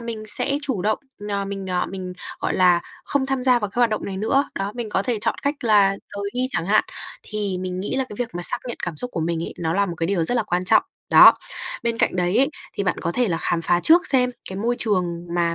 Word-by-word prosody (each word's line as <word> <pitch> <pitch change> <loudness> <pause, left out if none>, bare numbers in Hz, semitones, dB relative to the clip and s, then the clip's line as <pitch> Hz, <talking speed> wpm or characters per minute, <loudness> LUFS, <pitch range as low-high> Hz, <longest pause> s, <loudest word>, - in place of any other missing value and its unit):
mình 230 -2 -5
sẽ 280 +6 -1
chủ 260 -10 -2
động, 215 +1 +1 0.3
ờ, 200 -1 -1
mình, 195 -1 -5
ờ, 180 -1 0
mình, 185 -1 -6 0.3
gọi - - -1
là, 180 -2 +5 0.2
không 275 -2 0
tham 270 -1 -1
gia 250 -1 +4
vào 210 -4 -3
cái 240 - -2
hoạt 240 -2 +4
động 215 - -2
này 195 - -4
nữa, 270 +7 +1
đó, 195 +1 -3
mình 235 -3 -4
có 195 - +1
thể 235 0 -1
chọn - - +1
cách 285 +1 +1
là 205 -3 +5 0.3
rời 200 0 -3
đi 250 +1 0
chẳng 170 - -2
hạn. 215 +2 +4 0.4
Thì 205 -3 -3
mình 185 0 -3
nghĩ 205 - -3
là 265 - +1
cái 210 - -9
việc 245 -2 -1
mà 175 - -4
xác - - 0
nhận 240 - -4
cảm 175 -3 -5
xúc 250 +10 -3
của 170 - -3
mình 165 0 -1
ấy, - - -7
nó 165 -2 -1
là 200 0 +2
một 175 - -4
cái 165 - -1
điều 175 -3 +1
rất 245 - -1
là 230 - +2
quan 180 -3 -1
trọng. - - +5 0.3
Đó, - - +10 0.5
bên 230 -1 -1
cạnh - - +1
đấy 180 +4 +1
ấy, 275 +2 +4 0.3
thì - - -2
bạn 180 - 0
có 170 - -2
thể 250 -3 +1
là 165 - 0
khám 165 -1 0
phá 175 +1 +2
trước 335 - +5
xem 250 -2 +2 0.2
cái 190 - -6
môi 235 +4 0
trường 205 -6 +2 0.3
mà 170 -1 +1
200 Hz, 275 wpm, -22 LUFS, 180-240 Hz, 0.5 s, Đó